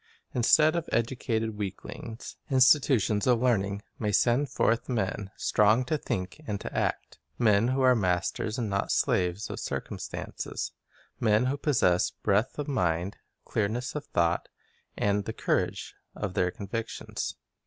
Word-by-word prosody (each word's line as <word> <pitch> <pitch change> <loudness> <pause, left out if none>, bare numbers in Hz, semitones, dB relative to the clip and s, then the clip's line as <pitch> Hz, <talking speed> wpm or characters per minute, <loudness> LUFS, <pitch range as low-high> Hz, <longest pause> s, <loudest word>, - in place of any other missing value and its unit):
Instead 155 +6 +5
of 170 - -2
educated 115 -2 -1
weaklings, 110 +3 -6
institutions 130 -6 +4
of 125 -2 +4
learning 100 -5 +1 0.2
may 105 -2 0
send 120 +7 +3
forth 115 -2 +1
men 100 -4 -1
strong 110 +4 +3
to 155 - 0
think 95 -3 -4
and 105 -2 -2
to - - -7
act, - - -2 0.2
men 110 -1 +4
who 130 +1 +1
are 130 0 +6
masters 95 +1 0
and 120 -3 -1
not 100 -1 -1
slaves" 90 +3 +1
of - - -5
circum 70 -1 -4
stances, - - -5 0.5
men 110 +1 +3
who 130 +2 +1
possess 120 - +2
breadth 105 +4 0
of 145 - -3
mind, 90 - 0 0.3
clearness 115 +4 -1
of 150 - -4
thought, 85 0 +1 0.5
and 100 0 +1
the - - -4
courage - - -1 0.2
of 100 -3 -3
their 90 -1 +2
convictions. 110 +5 -5
110 Hz, 145 wpm, -28 LUFS, 100-125 Hz, 0.5 s, are